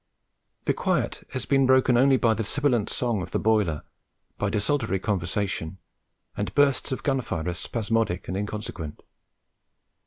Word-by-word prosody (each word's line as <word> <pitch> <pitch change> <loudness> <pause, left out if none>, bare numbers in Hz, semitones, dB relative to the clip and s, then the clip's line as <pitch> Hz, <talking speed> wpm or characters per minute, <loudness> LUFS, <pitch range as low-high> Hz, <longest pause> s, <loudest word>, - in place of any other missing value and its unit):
The - - +3
quiet - - -1
has 130 - -3
been 135 -2 +3
broken 130 -1 +5
only 135 +2 +5
by 115 -3 +3
the 110 +1 -2
sibilant 125 -2 +1
song 120 -5 -1
of - - -5
the - - -1
boiler, 105 -8 +1 0.6
by 105 - +1
desultory 110 0 0
conversation 95 -2 -2 0.6
and 100 0 -2
bursts 145 -1 +3
of 130 - -3
gunfire 125 - -1
as 90 0 -2
spasmodic 115 -5 -1
and 95 - -3
inconsequent. 100 -6 -5
110 Hz, 145 wpm, -26 LUFS, 95-130 Hz, 0.6 s, broken